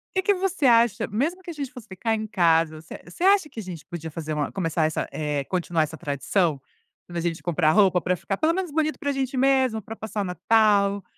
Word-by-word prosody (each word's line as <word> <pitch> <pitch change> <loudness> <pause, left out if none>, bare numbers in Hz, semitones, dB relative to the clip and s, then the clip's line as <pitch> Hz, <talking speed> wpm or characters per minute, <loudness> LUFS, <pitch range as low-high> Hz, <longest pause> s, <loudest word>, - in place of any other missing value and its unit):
Que 380 - +3
que 405 0 +4
você 370 -5 -1
acha 235 -3 +4
mesmo 310 - -1
que - - -9
a - - -7
gente 280 -4 -5
fosse 245 -4 -12
ficar 220 +4 -1
em 220 0 -3
casa, 165 -5 +2
você 160 - -10
você 175 - -7
acha 390 -4 +4
que 230 - -9
a - - -5
gente 175 -5 -8
podia 165 -2 -7
fazer 155 0 -5
uma 150 -1 -2
começar 165 -4 0
essa 155 - -1
eh, 150 -2 -2
continuar 175 -2 0
essa 155 +1 -6
tradição? 150 +2 0 0.5
Quando 175 - -7
a 170 - -1
gente 170 -1 -2
comprar 165 -2 +2
roupa, 190 -3 +4
pra 180 +2 0
ficar 195 +3 -4
pelo 320 +7 +2
menos 365 -3 -3
bonito 310 0 0
pra 285 - -1
gente 265 -1 -2
mesmo, 260 -4 +2
pra 225 +3 -8
passar 220 -1 -4
o - - 0
Natal, 200 +1 +2
200 Hz, 235 wpm, -24 LUFS, 165-265 Hz, 0.5 s, que